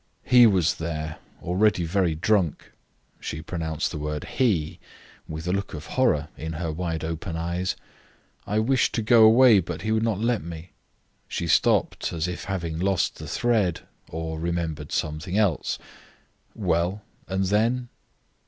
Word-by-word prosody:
He 125 -2 +7
was 90 -5 +2
there, 80 -2 -4 0.2
already 95 +1 +2
very 85 -1 +1
drunk." 90 -1 0 0.5
She 75 - -5
pronounced 80 -3 -3
the 75 - -5
word 75 0 -3
he 95 - 0 0.5
with 80 +2 -6
a 90 - +1
look 100 -3 -2
of 75 +1 -7
horror 80 - +2
in 80 +1 -5
her 80 0 -3
wide 80 -1 -3
open 80 +1 -4
eyes. 85 +2 -2 0.7
"I 105 - 0
wished 125 +4 +2
to 115 - 0
go 115 0 +6
away, 115 0 +7
but 85 -1 -5
he 110 - -1
would 110 0 +2
not 110 -3 0
let 115 +1 +1
me." 85 +1 -8 0.6
She - - -3
stopped, - - +2
as 85 0 -2
if 90 - -5
having 85 -4 -3
lost 95 -2 +1
the - - -7
thread, 110 -7 +1 0.3
or 80 0 -4
remembered 80 -3 -3
some 75 0 -1
thing 90 +4 -3
else. 100 -8 +1 0.8
"Well, 90 +5 0 0.2
and 95 0 0
then?" 115 +5 +1
90 Hz, 155 wpm, -25 LUFS, 80-105 Hz, 0.8 s, He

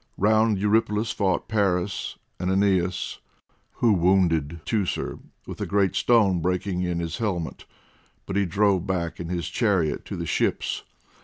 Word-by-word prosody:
Round 110 +1 +3
Eurypylus 105 +2 +1
fought 95 -3 0
Paris, 100 -3 0 0.2
and 90 +1 -1
Aeneas, 95 -2 +1 0.5
who 115 -3 +3
wounded 85 -4 +2
Teucer 105 -5 -1 0.3
with - - -8
a - - -2
great 100 -2 +2
stone, 100 -7 +3
breaking 90 +1 -1
in 90 -1 -1
his 85 -1 -4
helmet, 95 -7 -3 0.6
but 95 - -5
he 100 -2 +2
drove 100 0 +2
back 85 -3 -2
in 85 -1 -5
his 85 -2 -2
chariot 90 - +1
to - - -5
the - - -4
ships. - - 0
95 Hz, 145 wpm, -25 LUFS, 90-105 Hz, 0.6 s, Round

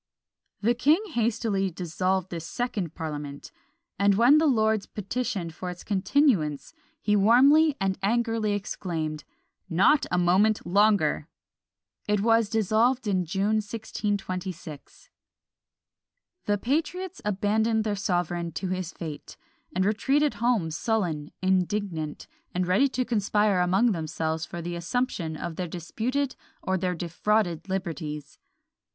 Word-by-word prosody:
The 230 +3 +3
king 285 +8 +3
hastily 220 -5 0
dissolved 185 +2 -2
this 165 -2 -5
second 205 -9 -3
parliament; 145 -3 -6 0.5
and 200 0 +4
when 245 +8 +6
the 320 - +3
lords 220 -5 +2
petitioned 200 -5 -3
for 180 +3 -6
its 180 0 -8
continuance, 195 - +1 0.3
he 210 -7 +1
warmly 275 +9 +5
and 195 -1 -1
angrily 225 0 +1
exclaimed, 165 -6 -4 0.4
"Not 190 - +4
a 180 - +1
moment 190 +5 +3
longer!" 190 -5 +3 0.8
It 210 -1 +2
was 225 0 +3
dissolved 225 +4 +2
in 185 -3 +1
June, 200 +5 +1
1626. 195 -7 -5 1.3
The 205 0 +1
patriots 330 - -2
abandoned 215 +2 +1
their 210 -1 -1
sovereign 175 -3 -1
to 190 - -3
his 185 -2 -3
fate, 155 -4 -8 0.4
and 185 +1 +2
retreated 275 +8 +2
home 230 -9 +1
sullen, 165 -5 -1
indignant, 185 -4 -1 0.3
and 180 0 +1
ready 185 +10 +3
to 255 -1 -1
conspire 210 -3 +2
among 190 +7 +3
themselves 160 -2 -2
for 170 -1 -6
the 175 +1 -4
assumption 170 -3 -2
of 170 0 -5
their 180 - -2
disputed 240 - -2 0.3
or 190 - 0
their 180 -1 -1
defrauded 175 +1 0
liberties. 160 -6 -4
195 Hz, 120 wpm, -26 LUFS, 175-225 Hz, 1.3 s, when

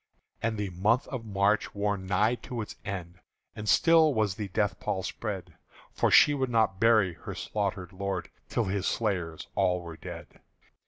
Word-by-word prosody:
And 115 -1 -1
the 100 -2 -3
month 105 +9 +1
of 125 -4 -5
March 100 +1 +1
wore 100 0 +1
nigh 100 +4 +1 0.2
to 125 -3 -3
its - - -9
end, 90 -2 -6 0.4
And 105 0 -4
still 160 - +5
was 105 -3 +1
the 105 +2 -5
death 105 +2 -1
pall 95 - -2
spread; 95 -4 -5 0.4
For - - +1
she 145 - +7
would 135 -3 -1
not 110 -5 +2
bury 110 -5 +4
her - - -8
slaughtered 100 -3 -3
lord 95 -1 -3 0.2
Till - - +1
his 95 0 -1
slayers 90 -8 -1
all 90 0 +2
were 85 -1 -8
dead. - - -10
100 Hz, 170 wpm, -29 LUFS, 95-110 Hz, 0.4 s, she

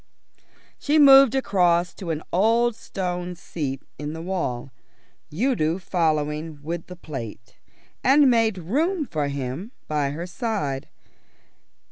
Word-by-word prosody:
She 295 +2 +2
moved 275 -3 +8
across 180 -8 +2
to 185 - -8
an 160 -1 -2
old 230 +5 +3
stone 180 -3 -4
seat 140 -5 -5 0.2
in 150 +1 -4
the 160 - -6
wall, 155 -9 -3 0.6
Udo 175 - +1
following 155 -4 -1
with 165 +2 -4
the 180 - -9
plate, 115 -9 -8 0.5
and 280 +2 +6
made 225 -4 +3
room 300 - 0
for 150 - -2
him 140 - -5
by 150 -2 0
her 160 +5 -5
side. 175 - -3
175 Hz, 120 wpm, -24 LUFS, 150-225 Hz, 0.6 s, moved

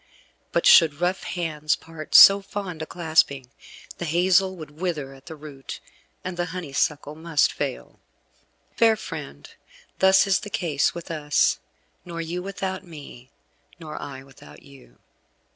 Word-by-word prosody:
But - - 0
should 155 -4 +6
rough 180 +2 0
hands 155 -4 -1
part 160 -1 -8
so 200 0 +10
fond 195 -4 -6
a 160 - -5
clasping, 155 -6 0 0.5
the 175 - -3
hazel 185 +3 +2
would 155 -4 -10
wither 150 -7 -3
at 135 0 -18
the 160 - -8
root, 145 -3 -9 0.4
and 185 -1 -5
the 175 0 -1
honeysuckle 150 -2 -2
must 160 -1 +1
fail. 65 +1 -5 0.8
Fair 225 -1 +4
friend, 150 - -8 0.5
thus 190 +1 +5
is 195 -2 +2
the 210 - -8
case 155 -8 0
with 170 -1 -7
us, 150 -2 +1 0.4
nor 170 -1 -7
you 170 +2 -4
without 190 0 -5
me, 145 -7 -12 0.5
nor 155 -2 -8
I 135 -1 -8
without 75 - -16
you. 135 - -18
160 Hz, 145 wpm, -24 LUFS, 145-180 Hz, 0.8 s, so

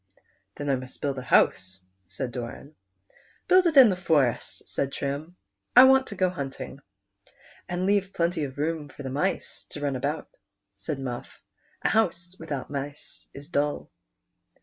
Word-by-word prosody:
" 100 0 -42
Then 145 - -4
I 135 -2 +2
must 130 0 -9
build 140 -2 -2
a - - -5
house," 95 -6 +2 0.3
said 125 +6 -4
Doran. 125 +4 -7 0.4
" - - -31
Build 370 -1 +6
it 315 -3 +1
in 255 -4 +10
the 190 - +1
forest," 150 -9 0
said 140 - -2
Trim; 145 +6 -4 0.2
" 100 0 -52
I 250 - +11
want 265 0 +6
to 205 - -7
go 185 -1 +2
hunting." 140 -4 -6 0.9
"And 180 +1 -1
leave 195 -1 +2
plenty 170 -2 0
of 135 0 -9
room 155 0 -2
for 145 - -10
the 130 - -4
mice 150 +8 -2
to - - -8
run 145 -2 -1
about," 125 - -2 0.5
said 100 +9 -4
Muff; 125 -3 -6 0.4
"a - - +3
house 180 -4 +1
without 145 -5 -5
mice 140 +1 -6
is 140 +2 -9
dull." 145 -2 -1
145 Hz, 170 wpm, -27 LUFS, 135-180 Hz, 0.9 s, I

